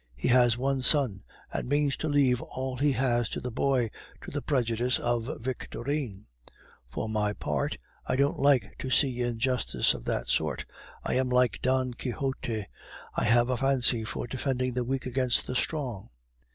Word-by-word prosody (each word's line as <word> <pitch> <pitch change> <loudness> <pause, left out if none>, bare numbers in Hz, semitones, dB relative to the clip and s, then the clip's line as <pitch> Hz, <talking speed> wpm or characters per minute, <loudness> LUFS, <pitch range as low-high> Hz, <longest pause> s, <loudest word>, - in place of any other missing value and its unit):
He - - -1
has 120 -1 +5
one 135 +1 0
son, 125 -8 +3 0.3
and - - -3
means 145 -1 +2
to 155 - -3
leave 135 -4 +3
all 130 0 -5
he 145 +2 +2
has 120 -3 +1
to - - -4
the 125 - -5
boy, 125 -2 +1 0.3
to - - -9
the 145 - -3
prejudice 125 -3 +1
of 120 0 -1
Victorine. 120 -2 -4 0.6
For 70 - -4
my 105 -1 0
part, 75 -8 -2 0.3
I - - +1
don't 140 +2 +1
like 140 -2 +3
to 130 - -4
see 130 -2 +2
injustice 120 +1 +2
of - - -8
this - - -1
sort. - - 0 0.4
I - - -1
am 130 0 +1
like 125 -6 +2
Don 130 -1 +1
Quixote, 120 -4 -3 0.5
I - - -1
have 120 +2 +4
a 125 - 0
fancy 130 -4 +3
for 110 - -4
defending 130 0 -2
the 125 0 -1
weak 130 +2 -2
against 130 -1 +1
the - - -4
strong. 125 - -2
125 Hz, 170 wpm, -28 LUFS, 120-135 Hz, 0.6 s, has